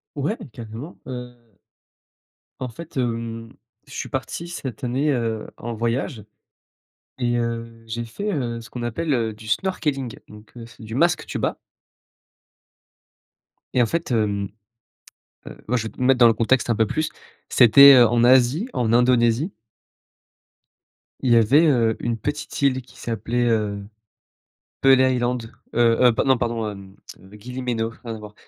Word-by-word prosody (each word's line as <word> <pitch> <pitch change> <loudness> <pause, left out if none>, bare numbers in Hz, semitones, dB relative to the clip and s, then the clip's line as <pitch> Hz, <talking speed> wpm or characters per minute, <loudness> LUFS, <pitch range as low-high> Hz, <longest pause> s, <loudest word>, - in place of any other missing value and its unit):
Ouais, 150 - -2
carrément, 115 +8 -9
heu 125 -3 -9 1.1
en 130 - -4
fait, 155 +5 -10
hem, 115 -2 -3 0.4
je - - -13
suis - - -5
parti 170 - -4
cette 135 -8 -7
année, 130 +5 0
heu, 115 -4 -2
en 120 +1 -5
voyage 115 0 -2 0.9
et 120 -1 0
heu, 115 -1 -4
j'ai 115 +1 -4
fait, 200 - -4
heu, 120 -6 -2
ce 115 - -13
qu'on 120 - -6
appelle, 140 +7 -1
heu, 115 -3 0
du 110 +1 -13
snorkeling, 140 - -1
donc 105 +1 -15
heu, 115 - -8
c'est 115 -1 -15
du 110 +1 -7
masque 170 +5 +2
tuba. - - -2 2.2
Et 125 - +3
en - - +4
fait, 165 +3 -3
hem, 100 -3 0 1.0
heu, - - -9
moi 125 +3 +1
je 115 - -2
vais 110 - -4
te - - -11
mettre 130 0 +3
dans 120 - +8
le 115 - +4
contexte 120 +3 +1
un 115 - +2
peu 110 +1 +2
plus, 155 +8 -2 0.4
c'était 135 +3 +8
en 120 0 +4
Asie 130 - +4
en 115 -2 0
Indonésie 120 - +3 1.7
il 125 - +1
y - - +7
avait, 135 +9 +5
heu, 115 -6 +2
une 120 -1 -2
petite 145 +5 -4
île 130 -2 +2
qui 120 - -19
s'appelait, 120 +1 -2
heu, 105 -3 -1 1.0
Pehl 135 -1 +6
Island, 125 -3 0 0.2
heu, - - 0 0.2
heu, 125 -2 +6
non 130 -2 +4
pardon, 115 -3 -2
hem, 100 -1 -11 0.4
Gili 125 +4 -7
Meno, 115 -3 -1
rien 115 -2 -5
à 110 - -9
voir, 105 -1 -11
120 Hz, 155 wpm, -22 LUFS, 115-130 Hz, 2.2 s, dans